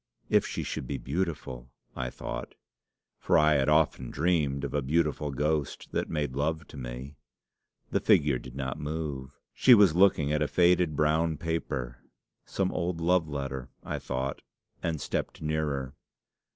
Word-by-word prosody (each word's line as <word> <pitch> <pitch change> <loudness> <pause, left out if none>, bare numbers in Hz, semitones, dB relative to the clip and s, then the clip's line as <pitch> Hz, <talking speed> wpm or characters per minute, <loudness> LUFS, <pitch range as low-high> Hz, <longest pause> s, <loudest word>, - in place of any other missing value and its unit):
'If - - +3
she - - -3
should 65 - -4
be - - -2
beautiful!' 70 -6 -3 0.3
I 60 -1 -2
thought - - -6 0.6
for - - +3
I 75 0 +5
had 70 0 +2
often 75 -5 +2
dreamed 75 -4 +1
of 70 - -3
a 75 - +1
beautiful 75 +1 0
ghost 75 +1 -1
that - - -1
made 75 -5 -2
love 80 +2 -1
to - - -12
me. 65 +3 -7 0.7
The - - +2
figure 70 -4 +3
did 65 0 -11
not 65 -2 -3
move. 75 -3 -5
She 125 - +7
was 100 -7 +6
looking 85 -5 +4
at 75 - +1
a 75 - +2
faded 90 -2 +3
brown 80 +2 +2
paper. 70 -7 -3 0.5
'Some 95 -1 0
old 85 -1 -2
love 85 -1 +2
letter,' 70 -2 -4
I - - -3
thought, 65 +2 -3 0.4
and 80 -2 -1
stepped - - -3
nearer. 75 -4 -2
75 Hz, 155 wpm, -29 LUFS, 70-80 Hz, 0.7 s, She